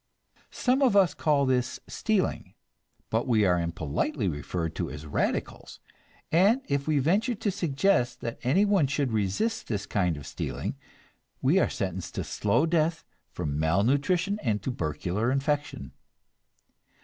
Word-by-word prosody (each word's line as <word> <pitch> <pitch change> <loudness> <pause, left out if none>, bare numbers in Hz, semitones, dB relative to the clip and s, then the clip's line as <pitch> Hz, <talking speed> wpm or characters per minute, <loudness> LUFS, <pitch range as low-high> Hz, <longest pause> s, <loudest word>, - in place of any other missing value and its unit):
Some 260 +2 +1
of 250 -7 +4
us 190 -5 +5
call 145 -3 +2
this 130 -1 0
stealing, 215 -4 -1 0.6
but 115 +3 0
we 110 -4 +3
are 90 -2 +3
impolitely 85 - -2
referred 80 +1 -3
to - - -2
as 75 +2 -8
"radicals," 75 - -3 0.5
and 205 +11 +4
if 140 0 -1
we 155 -1 +2
venture 200 - +2
to 210 -1 -1
suggest 170 -6 +1
that 115 0 -5
anyone 190 +5 +3
should 140 -2 -1
resist 110 - -1
this 105 -3 -2
kind 90 -6 0
of 70 - -9
stealing, - - -4 0.6
we 150 +9 +3
are - - +2
sentenced 95 -4 -4
to - - -2
slow 115 +8 +1
death 165 0 +1 0.3
from 75 0 -3
malnutrition 140 - +1
and 105 -6 -1
tubercular 90 - -1
infection. 140 - -2
130 Hz, 135 wpm, -27 LUFS, -, 0.6 s, us